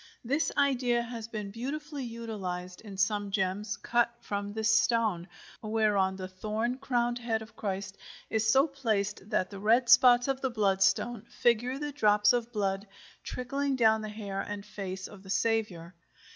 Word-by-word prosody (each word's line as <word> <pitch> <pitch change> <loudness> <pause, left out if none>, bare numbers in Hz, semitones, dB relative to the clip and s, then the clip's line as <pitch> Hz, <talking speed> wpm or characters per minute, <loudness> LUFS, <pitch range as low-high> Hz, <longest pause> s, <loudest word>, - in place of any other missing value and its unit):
This 285 +7 +1
idea 250 -4 +2
has 230 -2 -6
been 210 -3 -5
beautifully 285 +5 -5
utilized 195 -7 -5
in 205 -3 -10
some 205 +1 +1
gems 195 +1 -1
cut 240 0 +1
from 205 -2 -4
this 220 0 +2
stone, 215 -7 0 0.3
whereon 210 -3 +1
the 185 -1 -6
thorn 215 +6 -3
crowned 240 -2 0
head 225 -2 -1
of 220 - -16
Christ 195 -1 -4 0.3
is 220 0 0
so 270 +4 +5
placed 215 -8 -2
that 200 -4 0
the 200 - -7
red 230 +4 +3
spots 245 0 +7
of 270 -1 -1
the 265 - 0
bloodstone 210 +1 +1
figure 240 +2 +1
the 295 +1 -4
drops 210 -5 +4
of 240 -1 -1
blood 200 -2 -1 0.4
trickling 275 +2 -2
down 220 -3 +4
the 215 - -5
hair 200 -2 -4
and 205 -1 -6
face 190 -2 -6
of 205 -2 -13
the 190 - -14
Saviour. 200 -6 -1
220 Hz, 160 wpm, -30 LUFS, 200-240 Hz, 0.4 s, spots